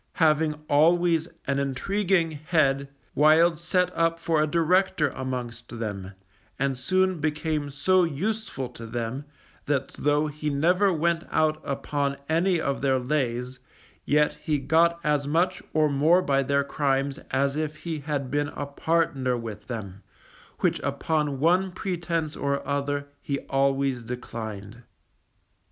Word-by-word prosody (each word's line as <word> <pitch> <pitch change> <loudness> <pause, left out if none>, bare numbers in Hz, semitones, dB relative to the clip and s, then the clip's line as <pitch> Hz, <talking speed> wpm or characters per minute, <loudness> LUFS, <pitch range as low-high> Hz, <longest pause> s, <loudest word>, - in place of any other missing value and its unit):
Having 155 -2 +2
always 165 +2 +3 0.2
an 140 0 0
intriguing 170 +5 0
head 145 -3 +1 0.2
Wild 155 +2 +5
set 180 +1 0
up 165 0 +2
for 165 -2 +1
a 155 - +2
director 170 -1 +2
amongst 120 -3 -5
them, 100 -4 -5 0.4
and 135 0 0
soon 185 +6 +1
became 150 -1 -1
so 185 +6 +3
useful 170 - -2
to 115 - -10
them 120 +4 -4 0.4
that 140 -2 0
though 145 +1 +1
he 150 0 -3
never 180 +8 +3
went 170 0 0
out 155 0 +1
upon 140 0 -2
any 170 +3 +2
of 140 -3 -2
their 135 -1 +2
lays, 125 -2 -2 0.4
yet 150 +1 +2
he 155 -2 0
got 165 +5 +3
as 145 -2 +1
much 175 +5 +1
or 155 -1 +3
more 155 +6 +3
by 140 -4 +2
their 140 +1 +1
crimes 140 0 -1
as 135 +1 +1
if 155 0 -4
he 165 -3 -3
had 140 -3 -3
been 145 +1 +1
a 145 - -3
partner 140 -4 0
with 115 -3 -7
them, 100 -5 -6 0.6
which - - +2
upon 150 -4 -1
one 180 +5 +3
pretence 170 -4 -2
or 140 -1 -2
other 140 0 -1 0.2
he 140 - -2
always 135 -1 0
declined. 115 -2 -7
145 Hz, 140 wpm, -26 LUFS, 135-165 Hz, 0.6 s, Wild